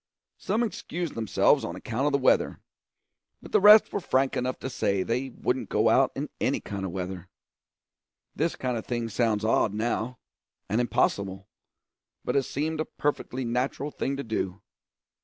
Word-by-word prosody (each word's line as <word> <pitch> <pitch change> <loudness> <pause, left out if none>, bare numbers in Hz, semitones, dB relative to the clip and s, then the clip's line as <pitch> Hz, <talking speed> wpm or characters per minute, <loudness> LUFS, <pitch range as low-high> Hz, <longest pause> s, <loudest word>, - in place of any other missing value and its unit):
Some 225 +3 0
excused 175 -6 -4
themselves 110 -2 +2
on - - -4
account 125 +5 -2
of - - +2
the 140 - +3
weather; 130 - +2 0.8
but - - -13
the - - +4
rest 210 +2 +8
were - - 0
frank 135 -6 +1
enough 125 +1 -1
to - - -3
say 100 -6 0
they 125 +6 -1
wouldn't 125 +1 -2
go - - +2 0.3
in - - -3
any - - +1
kind 100 -1 -5
of 95 - -4
weather. 90 -1 -5 1.1
This 165 +2 0
kind 125 -2 -2
of 110 - -6
thing 120 -2 -2
sounds 110 -1 +1
odd 110 -2 +2
now, 115 +2 -2 0.5
and 110 +5 +1
impossible, 100 -4 0 0.8
but - - -1
it 140 - +4
seemed 155 +3 -2
a 155 - 0
perfectly 130 -3 -2
natural 130 +4 -1
thing 135 0 -2
to 140 - -3
do. 100 -3 -3
125 Hz, 165 wpm, -27 LUFS, 105-140 Hz, 1.1 s, rest